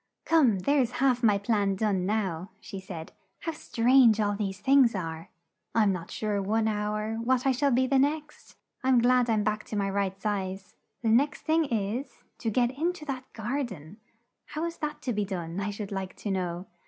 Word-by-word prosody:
"Come, 275 Hz, -11 st, +4 dB
there's 260 Hz, +1 st, +2 dB
half 255 Hz, -1 st, +2 dB
my 210 Hz, -4 st, +4 dB
plan 200 Hz, -1 st, +1 dB
done 195 Hz, -3 st, 0 dB
now!" 195 Hz, -4 st, -1 dB
she 195 Hz, -, -8 dB
said. 175 Hz, -4 st, -8 dB, 0.3 s
"How 330 Hz, -, -2 dB
strange 245 Hz, -5 st, +4 dB
all 205 Hz, -1 st, +1 dB
these 195 Hz, -2 st, -3 dB
things 265 Hz, -4 st, +4 dB
are! 165 Hz, -3 st, -5 dB, 0.5 s
I'm 215 Hz, -3 st, +4 dB
not 180 Hz, -3 st, -4 dB
sure 210 Hz, -2 st, -2 dB
one 220 Hz, +3 st, +1 dB
hour, 215 Hz, +1 st, -1 dB
what 250 Hz, +3 st, +1 dB
I 270 Hz, -, +4 dB
shall 280 Hz, +3 st, +2 dB
be 260 Hz, 0 st, +3 dB
the 270 Hz, +1 st, +3 dB
next! 300 Hz, +2 st, -2 dB, 0.3 s
I'm 260 Hz, -1 st, +4 dB
glad 245 Hz, 0 st, +4 dB
I'm 215 Hz, -2 st, +2 dB
back 215 Hz, +1 st, -1 dB
to -, -, -6 dB
my 200 Hz, -1 st, 0 dB
right 195 Hz, -1 st, -1 dB
size: 195 Hz, -2 st, -3 dB, 0.3 s
the 225 Hz, -, +2 dB
next 275 Hz, +7 st, +3 dB
thing 320 Hz, 0 st, +2 dB
is, 230 Hz, +1 st, -3 dB, 0.2 s
to 225 Hz, -, -1 dB
get 240 Hz, +2 st, +2 dB
in 320 Hz, +7 st, -1 dB
to 310 Hz, -4 st, -10 dB
that 260 Hz, -3 st, -5 dB
gar 240 Hz, +6 st, -2 dB
den 190 Hz, -, -9 dB, 0.5 s
how 310 Hz, +2 st, -4 dB
is 335 Hz, 0 st, -5 dB
that 300 Hz, -2 st, -5 dB
to 250 Hz, -2 st, -1 dB
be 210 Hz, 0 st, 0 dB
done, 180 Hz, -3 st, -4 dB
I 200 Hz, +1 st, -2 dB
should 205 Hz, 0 st, -6 dB
like 190 Hz, -1 st, -4 dB
to 205 Hz, -, -4 dB
know?" 180 Hz, -1 st, -2 dB
220 Hz, 200 wpm, -28 LUFS, 195-260 Hz, 0.5 s, Come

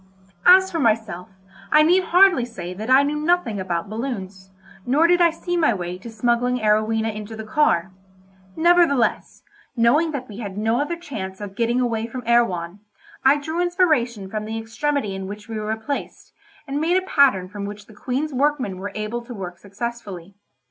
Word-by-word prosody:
As 375 Hz, +1 st, +7 dB
for 330 Hz, -, -2 dB
myself, 220 Hz, -, 0 dB, 0.4 s
I 305 Hz, 0 st, +6 dB
need 360 Hz, +4 st, +3 dB
hardly 360 Hz, -7 st, +5 dB
say 185 Hz, -7 st, -7 dB
that 215 Hz, +6 st, -7 dB
I 265 Hz, +2 st, +6 dB
knew 295 Hz, +1 st, -1 dB
nothing 305 Hz, -, +1 dB
about 175 Hz, -2 st, -3 dB
balloons; 200 Hz, -5 st, -6 dB, 0.3 s
nor 280 Hz, -, +3 dB
did 355 Hz, +1 st, +4 dB
I 340 Hz, -, +6 dB
see 350 Hz, +2 st, -4 dB
my 310 Hz, -10 st, +2 dB
way 180 Hz, -1 st, -5 dB
to 230 Hz, -, -9 dB
smuggling 240 Hz, +2 st, 0 dB
Arowhena 220 Hz, 0 st, +1 dB
into 215 Hz, +1 st, -7 dB
the 220 Hz, -, -7 dB
car; 215 Hz, -, +1 dB, 0.6 s
nevertheless, 335 Hz, -6 st, +2 dB, 0.3 s
knowing 245 Hz, +8 st, +3 dB
that 275 Hz, -4 st, -5 dB
we 210 Hz, 0 st, -10 dB
had 200 Hz, -4 st, -6 dB
no 225 Hz, +4 st, +1 dB
other 340 Hz, +4 st, -2 dB
chance 195 Hz, -, -7 dB
of 205 Hz, -2 st, -7 dB
getting 235 Hz, +2 st, +1 dB
away 230 Hz, -2 st, -1 dB
from 250 Hz, +2 st, -7 dB
Erewhon, 200 Hz, -6 st, +1 dB, 0.4 s
I 275 Hz, +2 st, +5 dB
drew 315 Hz, +4 st, -3 dB
inspiration 310 Hz, -, +1 dB
from 215 Hz, +2 st, -4 dB
the 220 Hz, +1 st, -4 dB
extremity 225 Hz, +1 st, -2 dB
in 190 Hz, 0 st, -5 dB
which 210 Hz, +1 st, -9 dB
we 225 Hz, -1 st, -4 dB
were 215 Hz, +1 st, -2 dB
placed, 280 Hz, +6 st, -6 dB, 0.3 s
and 280 Hz, +2 st, -2 dB
made 345 Hz, +3 st, +2 dB
a 375 Hz, -, -1 dB
pattern 265 Hz, -, +3 dB
from 200 Hz, +1 st, -6 dB
which 205 Hz, 0 st, -8 dB
the 220 Hz, -, -16 dB
Queen's 265 Hz, +8 st, -3 dB
workmen 260 Hz, -8 st, 0 dB
were 200 Hz, +2 st, -5 dB
able 215 Hz, +3 st, -3 dB
to 245 Hz, -1 st, -8 dB
work 180 Hz, -3 st, -7 dB
successfully. 200 Hz, -3 st, -7 dB
230 Hz, 185 wpm, -22 LUFS, 205-290 Hz, 0.6 s, As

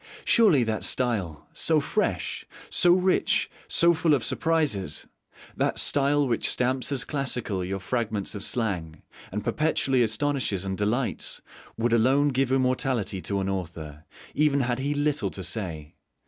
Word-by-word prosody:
Surely 190 Hz, -, +5 dB
that 110 Hz, -1 st, -2 dB
style, 105 Hz, -, -1 dB
so 160 Hz, -2 st, +2 dB
fresh, 210 Hz, +8 st, -2 dB, 0.3 s
so 175 Hz, -3 st, +5 dB
rich, 185 Hz, +1 st, +2 dB, 0.2 s
so 170 Hz, 0 st, +4 dB
full 160 Hz, -2 st, +3 dB
of 125 Hz, -, -2 dB
surprises 140 Hz, -, 0 dB, 0.5 s
that -, -, 0 dB
style 145 Hz, 0 st, +2 dB
which 115 Hz, -2 st, 0 dB
stamps 125 Hz, +1 st, 0 dB
as 130 Hz, -3 st, 0 dB
classical 125 Hz, -9 st, -2 dB
your 95 Hz, +2 st, -3 dB
fragments 110 Hz, -1 st, -2 dB
of 100 Hz, -2 st, -5 dB
slang, 90 Hz, -11 st, -2 dB, 0.3 s
and 105 Hz, +1 st, -3 dB
perpetually 135 Hz, -4 st, +1 dB
astonishes 115 Hz, -4 st, 0 dB
and 95 Hz, 0 st, -2 dB
delights 110 Hz, +6 st, -2 dB, 0.4 s
would 115 Hz, +1 st, +1 dB
alone 135 Hz, +5 st, +3 dB
give 135 Hz, -1 st, 0 dB
immortality 130 Hz, -6 st, 0 dB
to 100 Hz, +1 st, -2 dB
an 95 Hz, -, -2 dB
author, 80 Hz, -5 st, -5 dB, 0.3 s
even 145 Hz, -1 st, +2 dB
had 120 Hz, 0 st, -1 dB
he 145 Hz, +2 st, -1 dB
little 145 Hz, -7 st, 0 dB
to 95 Hz, -, -7 dB
say. 85 Hz, -6 st, -4 dB
120 Hz, 145 wpm, -26 LUFS, 95-145 Hz, 0.5 s, Surely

